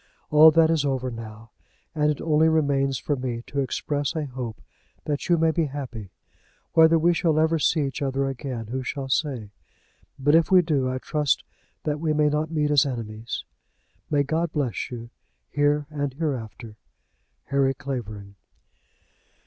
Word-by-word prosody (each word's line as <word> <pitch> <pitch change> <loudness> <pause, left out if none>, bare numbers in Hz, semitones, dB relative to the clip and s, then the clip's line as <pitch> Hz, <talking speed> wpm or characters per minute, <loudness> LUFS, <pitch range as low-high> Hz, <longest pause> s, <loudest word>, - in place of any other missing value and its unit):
All 155 +1 +9
that 160 +1 +4
is 160 -3 +2
over 130 -2 -1
now, 115 -1 -9 0.4
and 150 -1 +2
it 150 - -1
only 160 0 +3
remains 140 -4 +1
for 145 +6 -1
me 125 -3 -4
to 140 - -4
express 145 +3 -2
a 155 -2 -1
hope 125 -4 -6 0.5
that 145 +2 -3
you 170 - +5
may 165 0 +3
be 165 0 +1
happy. 130 -8 -6 0.6
Whether 160 0 +6
we 170 +2 +3
shall 165 -2 +1
ever 160 +1 +3
see 155 +1 +2
each 140 +1 -3
other 135 0 0
again 135 -3 -4
who 130 +1 -2
shall 135 +1 -4
say? 130 -7 -1 0.7
but 145 +2 +2
if 165 0 +4
we 185 -1 +6
do 140 -6 0
I 130 - -2
trust 145 +1 0 0.4
that 150 -1 -1
we 155 -1 0
may 150 0 +3
not 150 +1 -1
meet 150 -2 0
as 145 -2 +5
enemies. 115 -4 -5 0.6
May 145 -2 +2
God 160 +3 -1
bless 145 -7 -2
you 120 -1 -8 0.4
here 145 0 +2
and 145 -3 -3
hereafter. 120 -7 -4 0.7
HARRY 135 -1 +2
CLAVERING. 110 -8 -6
145 Hz, 165 wpm, -25 LUFS, 130-155 Hz, 0.7 s, All